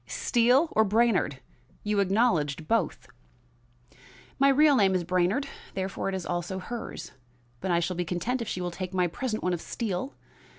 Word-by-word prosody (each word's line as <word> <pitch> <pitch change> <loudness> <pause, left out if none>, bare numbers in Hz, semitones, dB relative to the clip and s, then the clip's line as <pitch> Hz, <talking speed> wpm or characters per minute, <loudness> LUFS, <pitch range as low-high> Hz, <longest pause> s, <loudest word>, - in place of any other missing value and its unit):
Steele 250 +6 +3
or 220 - +4
Brainard? 210 - +1 0.4
You 210 -1 0
acknowledged 180 -7 +1
both." 135 - 0 1.3
"My 275 +1 +5
real 290 +1 +5
name 195 -5 +3
is 180 - 0
Brainard; 185 - +1 0.3
therefore, 195 0 -2
it 195 - -2
is 185 - -4
also 175 +2 -3
hers. 230 +5 -6 0.5
But 190 - -4
I 170 -1 +3
shall 180 +2 -2
be 180 - -1
content 185 +9 -2
if 230 - -4
she 180 - -3
will 175 0 -2
take 185 +1 -6
my 180 -1 +3
present 215 +6 -3
one 180 - +1
of 170 - -3
Steele. 230 +4 -4
190 Hz, 170 wpm, -27 LUFS, 175-235 Hz, 1.3 s, My